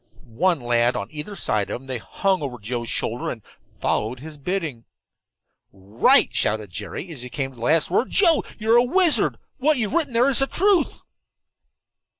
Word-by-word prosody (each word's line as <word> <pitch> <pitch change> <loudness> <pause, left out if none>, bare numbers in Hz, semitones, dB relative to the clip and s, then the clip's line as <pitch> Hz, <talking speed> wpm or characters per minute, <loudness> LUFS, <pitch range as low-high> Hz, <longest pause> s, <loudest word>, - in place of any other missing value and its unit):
One 165 +9 0
lad 120 0 +1
on 100 - -4
either 155 +7 -7
side 105 - -1
of - - -4
him, 135 - -17
they 130 -2 -4
hung 190 - -1
over 135 -4 -5
Joe's 120 +2 -5
shoulder - - -2
and - - -7 0.4
followed 115 +4 -1
his 150 +1 -10
bidding. 155 -7 -4 0.9
"Right!" 100 +3 +3
shouted 105 -3 -1
Jerry, 105 - -6
as 145 -6 -7
he 125 - -7
came 135 +1 -3
to - - -18
the - - -13
last 160 +7 +1
word. 235 - +1
"Joe, 335 -6 +3
you're 225 +2 +3
a 240 - +5
wizard, 340 +5 +4
and - - -32 0.2
what 305 0 +4
you've 220 -1 -2
written 310 -6 +1
there 240 +3 +3
is 260 - +4
the 270 - +1
truth." 380 -2 +1
150 Hz, 185 wpm, -22 LUFS, -, 0.9 s, a